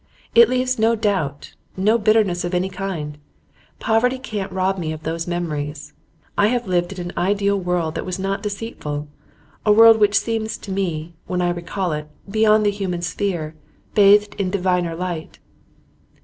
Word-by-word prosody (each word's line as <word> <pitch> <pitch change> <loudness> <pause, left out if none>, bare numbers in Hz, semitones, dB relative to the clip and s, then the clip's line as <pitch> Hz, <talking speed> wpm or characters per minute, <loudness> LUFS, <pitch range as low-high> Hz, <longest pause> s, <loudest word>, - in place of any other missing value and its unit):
It 470 -1 +7
leaves, 255 -1 0
no 225 +1 +3
doubt, 190 -10 -2 0.2
no 215 +5 +3
bitterness 210 -5 +2
of 175 +1 -2
any 185 +2 0
kind. 180 -6 -5 0.6
Poverty 240 +3 +2
can't 210 -6 -5
rob 190 0 0
me 160 -2 -2
of 155 0 -7
those 165 +1 -3
memories. 150 -4 -4 0.4
I 205 - +4
have 245 +1 0
lived 180 -1 0
in 190 - -9
an 175 0 -5
ideal 200 +2 +1
world 175 -3 -1
that - - -3
was 185 0 -4
not 195 +1 -2
deceitful, 200 -9 -5 0.6
a 210 - +4
world 225 +1 +8
which 205 -1 +4
seems 225 -1 -1
to 200 - -9
me, 170 -4 -2
when 180 - -1
I 175 -1 +1
recall 175 +1 -3
it, 150 0 -4 0.2
beyond 215 +1 +3
the 205 - +3
human 185 -4 -3
sphere, 175 -4 -2 0.4
bathed 205 0 +5
in 190 -2 0
diviner 180 -3 0
light. 175 -2 -5
190 Hz, 165 wpm, -21 LUFS, 175-210 Hz, 0.6 s, world